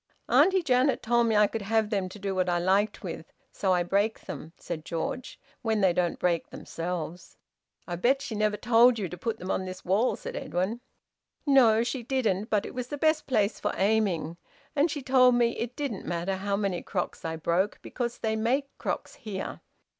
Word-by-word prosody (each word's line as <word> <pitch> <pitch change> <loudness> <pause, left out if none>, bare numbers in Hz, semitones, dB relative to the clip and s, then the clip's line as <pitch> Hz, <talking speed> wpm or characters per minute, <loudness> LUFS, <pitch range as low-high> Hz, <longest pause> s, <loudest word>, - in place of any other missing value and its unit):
"Auntie 375 -1 +4
Janet 255 -2 +2
told 235 0 +3
me 220 - +2
I 210 0 +6
could 220 +2 -3
have 220 +1 +1
them 195 -3 0
to 200 - -10
do 195 -1 -3
what 185 -1 +1
I 175 - +2
liked 195 +5 +1
with. 165 -3 -6 0.2
So 190 - 0
I 180 -1 +3
break 200 +5 0
them," 160 - -8
said 160 -3 -6
George, 170 +9 -4 0.2
"when 220 -3 0
they 190 -2 +4
don't 175 -1 0
break 175 -2 0
themselves!" 175 0 -6 0.5
"I 175 -1 -3
bet 255 +9 +3
she 260 -4 -5
never 210 0 +1
told 235 +2 +5
you 200 -4 -2
to 180 - -7
put 220 +5 -3
them 185 -1 -4
on 190 - -1
this 185 0 -8
wall," 200 +7 +2
said - - -7
Edwin. 190 +7 -2 0.6
"No, 240 -6 +5
she 250 +1 -3
didn't. 225 -5 0
But 210 -2 +1
it - - -7
was 250 -1 -4
the 290 - -5
best 310 +1 +2
place 215 -6 +1
for - - -1
aiming. 190 -6 +1 0.4
And 295 +4 +3
she 290 -2 -4
told 255 -1 +5
me 240 -1 +3
it 240 +1 -4
didn't 275 -9 -4
matter 175 +2 -1
how 200 +1 -1
many 195 -4 -1
crocks 180 -3 -4
I 160 0 -3
broke, 170 +5 0
because 240 -1 -3
they 220 -1 -1
make 260 +6 0
crocks - - -3
here. 200 -4 -6
210 Hz, 200 wpm, -28 LUFS, 185-240 Hz, 0.6 s, I